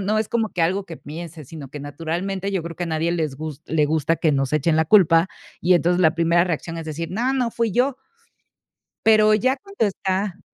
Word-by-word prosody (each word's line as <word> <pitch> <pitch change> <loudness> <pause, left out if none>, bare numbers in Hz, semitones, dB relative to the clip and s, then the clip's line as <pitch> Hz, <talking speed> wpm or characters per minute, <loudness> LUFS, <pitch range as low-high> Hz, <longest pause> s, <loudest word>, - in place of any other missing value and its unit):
no 210 +2 0
es 215 - -1
como 225 -3 0
que 180 - -4
algo 185 +4 +1
que 170 -4 -9
pienses, 155 -1 -9
sino 150 -4 -9
que 145 +2 -8
naturalmente 175 +7 -4
yo 190 -3 -1
creo 165 0 -7
que 175 - -4
a - - -5
nadie 160 +1 0
les 160 -5 -2
gus 155 -1 -7
le 155 -2 +1
gusta 160 +2 +1
que 160 0 +1
nos 135 -1 0
echen 155 +2 +2
la 160 - +3
culpa, 165 -2 +5 0.4
y 180 +2 +4
entonces, 175 +1 +3
la 160 -1 +4
primera 170 +1 +3
reacción 165 -1 -3
es 165 - -5
decir: 160 +1 -5
"No, 240 +8 0
no 250 -3 0
fui 230 -3 -1
yo". 255 +3 +1 1.1
Pero 215 -1 +6
ya 255 +5 +2
cuando 395 - -3
está 195 -1 -2
170 Hz, 220 wpm, -22 LUFS, 160-200 Hz, 1.1 s, Pero